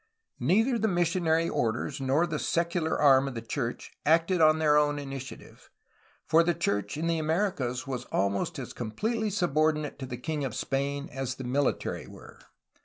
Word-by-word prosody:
Neither 225 - +2
the 220 - +2
missionary 170 -3 +1
orders 130 +4 -1
nor 135 +6 +2
the 160 -4 -3
secular 170 -1 0
arm 140 -2 +5
of 135 - -5
the 115 - -4
church 120 +1 -4
acted 165 +3 +3
on 155 0 +6
their 155 -2 +3
own 145 0 +3
initiative, 135 -2 -8 0.6
for 160 +1 +5
the 170 0 +1
church 105 - -1
in 160 - -2
the 165 -1 +1
Americas 155 -7 -1
was 130 -2 -4
almost 100 0 -1
as - - -6
completely 215 - -2
subordinate 155 -6 0
to 130 - -5
the 125 - -5
king 150 +3 -3
of 135 - -3
Spain 140 +1 -2
as 135 0 -3
the 130 - -7
military 135 +3 -1
were. - - -13
150 Hz, 170 wpm, -28 LUFS, 130-170 Hz, 0.6 s, on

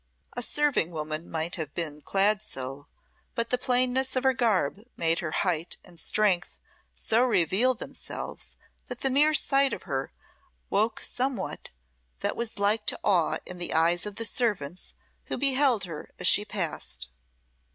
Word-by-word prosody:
A 245 - -3
serving 290 - +1
woman 155 0 -5
might 165 +2 -1
have 155 -3 -5
been 150 -3 -3
clad 200 +4 +2
so; 135 -7 -7 0.5
but 235 0 -1
the 250 - +3
plainness 255 +1 +2
of 255 - +1
her 265 0 +4
garb 215 - +1
but 215 +4 -19
made 165 0 +2
her 170 - -3
height, 170 0 -1
and 175 -2 -10
strength, 190 -1 +1 0.4
so 230 +2 +2
reveal 235 +2 +3
themselves, - - -3 0.3
that 250 -1 -7
the 270 - +1
mere 300 +3 +5
sight 275 -2 +4
of - - -5
her 135 -2 -3 0.6
woke 220 +3 +1
somewhat 250 -6 -3 0.5
that - - -1
was 235 -2 -4
like 210 +2 +2
to - - +1
awe 180 -6 +2
in 180 -1 -7
the 175 - -2
eyes 170 +4 +3
of 205 - -6
the 230 - -2
servants 200 - -1 0.3
who - - -3
beheld 270 -5 +3
her 165 -5 -7
as 180 - -5
she 205 +3 +6
passed. 160 - -3
200 Hz, 160 wpm, -27 LUFS, 165-250 Hz, 0.6 s, she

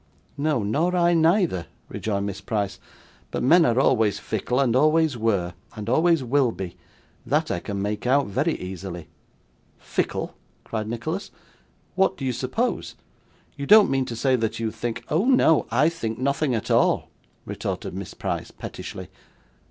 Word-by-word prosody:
'No, 145 -5 0
nor 160 - +1
I 175 -1 +4
neither,' 165 - +2 0.2
rejoined 100 -2 -2
Miss 100 -1 -5
Price; 105 -3 -2 0.5
'but - - -3
men 165 +6 +6
are 120 +2 +2
always 110 -6 +3
fickle, 110 +4 -2
and 125 -4 +2
always 155 +1 +3
were, 100 -6 0 0.2
and 105 -1 -6
always 160 +4 +3
will 130 0 +2
be; 95 -5 -6 0.5
that - - 0
I - - -1
can 100 +2 -4
make 105 +3 -3
out, 140 +2 +4
very 150 - 0
easily.' 90 -3 -7 0.7
'Fickle!' - - -2 0.3
cried 110 -1 -4
Nicholas; 155 - -4 0.6
'what 190 - +2
do 135 - -4
you 130 - 0
suppose? 130 - -2 0.6
You 140 -1 -5
don't 215 -5 +7
mean 135 -1 +1
to 120 - -5
say 130 +3 +2
that 115 -3 -2
you 115 -1 -1
think 120 +1 -4
' - - -24
'Oh 165 +8 +2
no, 250 - +4
I 130 +7 +3
think 115 -10 -3
nothing 140 0 0
at 110 - -3
all,' - - +3 0.4
retorted - - -4
Miss 95 0 -7
Price, - - -3
pettishly. - - -8
125 Hz, 160 wpm, -24 LUFS, 105-155 Hz, 0.7 s, don't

